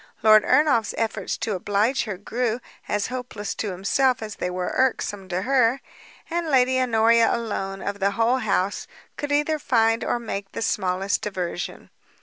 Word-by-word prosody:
Lord 215 -1 +7
Ernolf's 285 -8 +3
efforts 220 -4 -2
to 220 - -2
oblige 205 +8 0
her 210 -4 -4
grew 230 +3 -2 0.3
as 205 +1 -1
hopeless 235 -5 -5
to 210 - -3
himself, 225 +7 +1
as 215 -1 -7
they 180 - -2
were 180 0 -3
irksome 205 -6 0
to 185 +1 -2
her; 255 0 +3 0.5
and 340 0 -2
Lady 260 -1 +3
Honoria 230 -1 +4
alone, 195 -4 -3
of 200 0 -4
the 200 0 +2
whole 230 +3 +3
house, 195 -4 -1 0.3
could 290 0 -4
either 295 +2 +1
find 225 -3 +2
or - - 0
make 200 -4 -6
the - - -3
smallest 190 -1 0
diversion. 180 -3 -5
225 Hz, 160 wpm, -24 LUFS, 200-250 Hz, 0.5 s, Lord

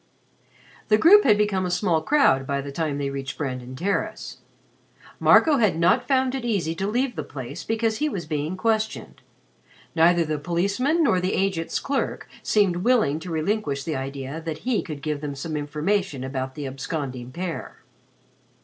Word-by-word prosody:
The 215 - +5
group 395 - +7
had 210 -5 +5
become 205 -3 +1
a 180 - -1
small 175 -3 +1
crowd 160 - +3
by 140 0 -1
the 140 0 -5
time 150 -1 -2
they 140 -1 -2
reached 135 -1 -5
Brandon 130 -3 -4
Terrace. 195 +9 -2 0.8
Marco 305 -3 +5
had 215 -8 +2
not 170 +1 +3
found 260 -2 +2
it 265 -2 -3
easy 195 -9 0
to 190 +4 -3
leave 245 +3 0
the 155 - -3
place 140 +3 -7
because 225 0 0
he 300 +5 0
was 185 - -4
being 155 +3 -3
questioned. 220 0 -1 0.7
Neither 170 +1 +4
the 155 -1 -2
policeman 200 - +1
nor 225 -10 +3
the 185 +2 0
agent's 190 -4 -1
clerk 275 -1 -2
seemed 200 -5 +2
willing 205 - +2
to 180 - -8
relinquish 160 -3 -1
the 160 - -3
idea 135 +3 -5
that 160 +2 -6
he 245 -4 +2
could 150 -4 -8
give 150 -2 -2
them 145 -2 -4
some 155 +3 -5
information 150 +1 -1
about 130 0 -4
the 145 -2 -5
absconding 135 -2 -5
pair. 175 +3 -6
170 Hz, 170 wpm, -24 LUFS, 145-210 Hz, 0.8 s, group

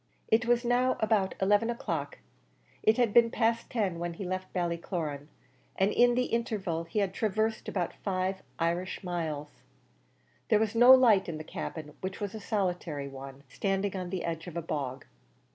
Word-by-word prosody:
It 225 +1 +3
was 240 0 +3
now 250 +2 +2
about 210 -3 +1
eleven 205 +4 +3
o'clock; 240 - -3 0.6
it 220 - +4
had 240 -4 +2
been 235 -1 +6
past 230 0 0
ten 195 -8 -1
when 170 0 -3
he 195 - -6
left 185 +1 -4
Ballycloran, 170 -4 -3 0.5
and 195 +2 +2
in 245 +1 +4
the 250 - +2
interval 205 -9 -2
he 165 - -6
had 200 -2 +1
traversed 220 +2 -1
above 180 -4 -2
five 190 -1 -1 0.2
Irish 175 +4 -1
miles. 160 -5 -4 0.9
There 215 - +5
was 215 0 0
no 240 +2 +8
light 225 -8 +6
in 160 - -4
the 155 - -6
cabin, 155 -1 -6
which 190 0 -4
was 205 -2 -4
a 220 - -6
solitary 180 -9 -2
one, 135 0 -10
standing 195 +6 -1
on 180 -2 -4
the 185 -1 -3
edge 165 0 -4
of 170 -1 -6
a - - -1
bog. 135 -4 -4
190 Hz, 175 wpm, -30 LUFS, 170-220 Hz, 0.9 s, no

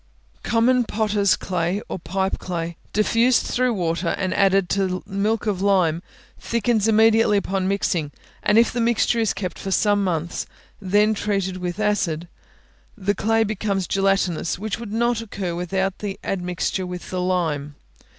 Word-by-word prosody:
Common 245 +2 +3
potters' 210 -3 +1
clay, 180 +1 -1
or - - -5
pipe 190 +3 -2
clay, 170 -2 -4 0.2
diffused 230 +4 +3
through 250 -1 +1
water, 170 -1 -1
and 185 -2 -1
added 195 -1 +3
to 190 -2 0
milk 205 +3 -1
of 200 -4 -1
lime, 180 -5 +2 0.4
thickens 230 -2 0
immediately 220 -1 +4
upon 195 -1 -1
mixing; 180 -6 0 0.3
and 210 - +3
if 230 - +5
the 240 - -1
mixture 235 0 +2
is 225 -3 +2
kept 185 -3 -5
for 195 - -5
some 205 +1 +2
months, 170 -2 -2 0.3
and 190 -2 -8
then 210 +2 +4
treated 195 -3 -1
with 180 +1 -4
acid, 180 -6 0 0.7
the 205 0 0
clay 225 +3 +2
becomes 200 -3 -1
gelatinous, 195 -4 0
which 215 +3 -4
would 230 -3 -7
not 235 +1 +1
occur 200 -5 -4
without 190 +2 -2
the 200 -2 -5
admixture 180 0 -2
with 180 0 -7
the 185 -1 -1
lime. 160 -6 -1
195 Hz, 155 wpm, -22 LUFS, 180-215 Hz, 0.7 s, if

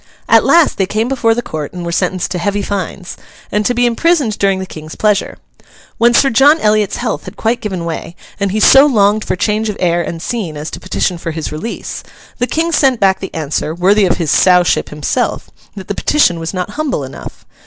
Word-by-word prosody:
At - - +5
last 335 -10 +3
they 190 - +1
came 220 +4 -1
before 240 -4 +1
the 240 - -2
court 155 0 -6
and 175 -1 -6
were 170 - -3
sentenced 180 +1 -1
to 180 - -2
heavy 205 +3 -1
fines, 190 -2 -5 0.3
and 210 - 0
to 245 - 0
be 245 +1 +2
imprisoned 245 -1 +1
during 195 -1 +2
the 190 - -4
King's 155 -3 -10
pleasure. 210 -2 0 0.6
When 235 +1 +4
Sir 270 +2 +4
John 285 +7 +5
Eliot's 210 -3 +1
health 245 - -3
had - - -10
quite 230 +2 -1
given 185 -5 -4
way, 165 0 -5 0.2
and 200 -1 0
he 215 - -1
so 270 +6 +7
longed 210 -4 +2
for - - -2
change 215 +3 -1
of 210 - -4
air 175 -1 +1
and 165 0 -5
scene 180 -5 -4
as 150 +2 -6
to - - -7
petition 185 -1 -2
for 170 - -5
his 160 -1 -5
release, 155 +10 -6 0.4
the 245 - 0
King 330 +4 -1
sent 265 -7 +2
back 190 -1 +2
the 190 - -6
answer 155 0 -2
(worthy 195 +4 +3
of 180 - +1
his 165 -4 -1
Sowship 180 -2 +3
himself) 150 - -2 0.2
that 190 -3 -9
the - - -2
petition 180 - +2
was 165 0 -4
not 180 -2 -4
humble 285 - -2
enough. 130 - -10
200 Hz, 215 wpm, -15 LUFS, 175-235 Hz, 0.6 s, so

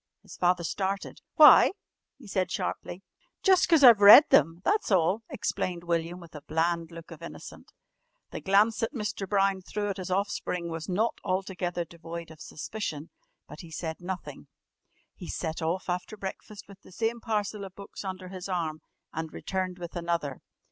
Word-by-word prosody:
His - - -12
father 180 0 +1
started. 195 +3 -3
"Why?" - - +8 0.4
he 270 - -15
said 190 -3 -1
sharply. 180 +1 -4 0.4
"Jus' 375 -2 +5
'cause 325 -5 +4
I've 235 -5 +9
read 200 +1 +11
them, 165 +4 +4
that's 420 +1 +1
all," 190 +2 +2
explained 180 -3 -3
William 170 +1 -2
with 170 -2 -14
a 150 - -9
bland 165 +2 -1
look 165 -1 -11
of - - -11
innocence. - - -10 0.6
The - - -6
glance 205 +3 +3
that 225 +6 -2
Mr. 210 -4 -4
Brown 195 -1 +2
threw 205 +2 -3
at 195 - -3
his 185 -1 -6
offspring 180 -2 -2
was 165 0 -6
not 215 +6 0
altogether 185 -2 -2
devoid 170 0 -9
of 155 - -14
suspicion, 160 -3 -6 0.4
but - - -11
he 170 - -10
said 160 0 -5
nothing. 185 +1 -7 0.7
He 180 - -10
set 160 0 -4
off 170 +4 -2
after 180 +4 -3
breakfast 200 +1 -8
with 200 0 -15
the - - -17
same 225 +4 -2
parcel 210 -2 -2
of 190 -1 -9
books 200 +1 -9
under 185 -1 -6
his 185 0 -7
arm 160 -4 -2 0.3
and 160 0 -4
returned 185 -1 -3
with 175 0 -8
another. 170 -5 -2
185 Hz, 170 wpm, -28 LUFS, 170-200 Hz, 0.7 s, read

